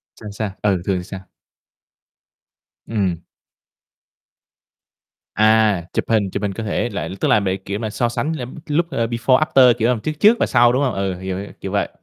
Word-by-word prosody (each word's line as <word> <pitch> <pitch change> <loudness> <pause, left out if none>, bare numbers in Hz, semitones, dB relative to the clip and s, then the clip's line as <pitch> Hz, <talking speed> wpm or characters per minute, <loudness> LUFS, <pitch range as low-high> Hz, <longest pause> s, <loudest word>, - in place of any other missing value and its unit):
Sao, 105 - -9
sao? 105 -1 -4
Ừ, 95 -4 +1
thường 95 -2 0
thì 90 - -5
sao? 95 +1 -8 1.7
Ừm. 95 -7 -1 2.2
À, 110 -3 +3
chụp - - -1
hình 105 -4 +2
chụp 100 - -4
hình 100 -1 -1
cơ 115 - -5
thể 110 +3 -1
lại, 100 -6 -4
tức - - 0
là - - +4
để, 95 -1 -1
kiểu 100 +2 -5
mà, 110 - -3
so 120 +3 -1
sánh 150 +6 -2
lem 125 -4 -7
lúc, 170 +3 0
ơ, 115 -5 0
before, 120 +2 +2
after, 130 -5 +5
kiểu 115 0 +1
làm 125 -3 +1
trước 155 - -3
trước 225 +3 +6
và - - +3
sau, 120 -1 +4
đúng 130 +3 +1
hông? 130 -4 0
Ừ, 95 -1 -2
hiểu, 95 0 -4
hiểu, 100 - -6
kiểu 95 - -5
vậy. 100 - 0
110 Hz, 200 wpm, -20 LUFS, 100-120 Hz, 2.2 s, trước